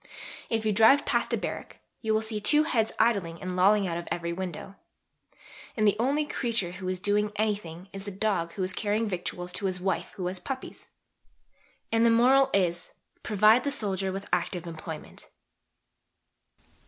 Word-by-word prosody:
If 225 -1 -1
you 215 - +3
drive 225 +7 +6
past - - 0
a - - +2
barrack, - - -5 0.2
you 220 - -1
will 220 0 +2
see 220 -1 -2
two 300 +8 +4
heads 225 -8 +1
idling 195 -8 +1
and 185 -1 -4
lolling 195 +2 +4
out 170 -1 -2
of 170 - -9
every 170 0 -2
window. 185 +1 -6 1.0
And 215 -1 +3
the 205 - +4
only 280 +5 +1
creature 230 -10 -1
who 185 +1 -7
is 185 0 -2
doing 205 +2 +1
anything 200 -5 -2
is 195 0 -7
the - - -4
dog 190 -4 -1
who 190 - -3
is 185 0 -1
carrying 215 +3 0
victuals 180 -1 -4
to 200 - -1
his 185 -1 -2
wife 190 +1 -1
who 185 - -4
has 180 +1 -2
puppies. 260 +4 -7 1.0
And 225 0 +3
the 235 - +6
moral 260 +4 +5
is: 175 -3 0 0.3
Provide 215 +3 +4
the 285 - 0
soldier 195 -8 -1
with 195 +1 -6
active 180 0 -1
employment." 160 -2 -8
200 Hz, 175 wpm, -28 LUFS, 180-220 Hz, 1.0 s, drive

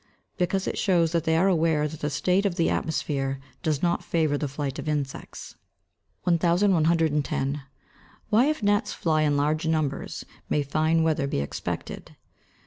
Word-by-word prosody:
_ - - -36 0.3
Because 190 +2 0
it - - -2
shows 170 -4 +2
that 170 -1 0
they 160 0 +2
are 185 +4 +4
aware 160 -4 +2
that 155 0 -8
the 150 - -1
state 180 +7 +1
of 180 - -3
the 170 -2 +1
atmosphere 135 -4 -1 0.2
does 155 -1 -1
not 175 -1 +1
favour 155 -3 +1
the 145 0 -2
flight 140 -1 -4
of 155 - -4
insects. 145 -3 -4 0.7
1110. 165 -5 +2 0.7
_Why 245 +7 +5
if 305 -7 -2
gnats 205 +2 +2
fly 155 -2 +1
in 145 -2 +2
large 155 +3 0
numbers 155 -4 -2 0.2
may 150 - +1
fine 155 +3 +1
weather 155 -3 +1
be 140 - -1
expected? 70 - -5
160 Hz, 160 wpm, -26 LUFS, 145-170 Hz, 0.7 s, Why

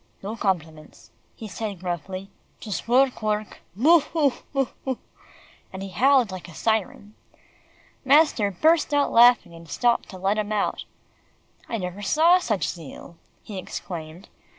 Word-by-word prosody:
"No 210 +3 -4
compliments," 160 -7 -4 0.2
he 220 - -8
said 205 0 -5
gruffly, 185 +2 -5 0.3
"just 210 -1 -5
work, 255 +1 +3
work 215 0 -2 0.2
Boo, 315 - +6
hoo! 295 -3 0 0.2
boo 275 -2 0
hoo!" 260 -2 -2 0.7
and 190 0 -7
he 195 - -6
howled 250 +3 +3
like 185 -2 -8
a 170 - -13
siren. 215 -1 -2 0.9
Master 275 -6 +4
burst 310 - +2
out 285 -1 +2
laughing, 240 -6 +5
and 165 -1 -13
stopped 240 +6 +1
to 190 - -9
let 195 +3 0
him 210 0 -3
out. 210 -1 -1 0.8
"I 230 - -2
never 180 0 -5
saw 325 - +4
such 215 - -1
zeal," 170 +1 -9 0.3
he 200 -3 -7
exclaimed. 175 -1 -8
210 Hz, 145 wpm, -24 LUFS, 185-255 Hz, 0.9 s, Boo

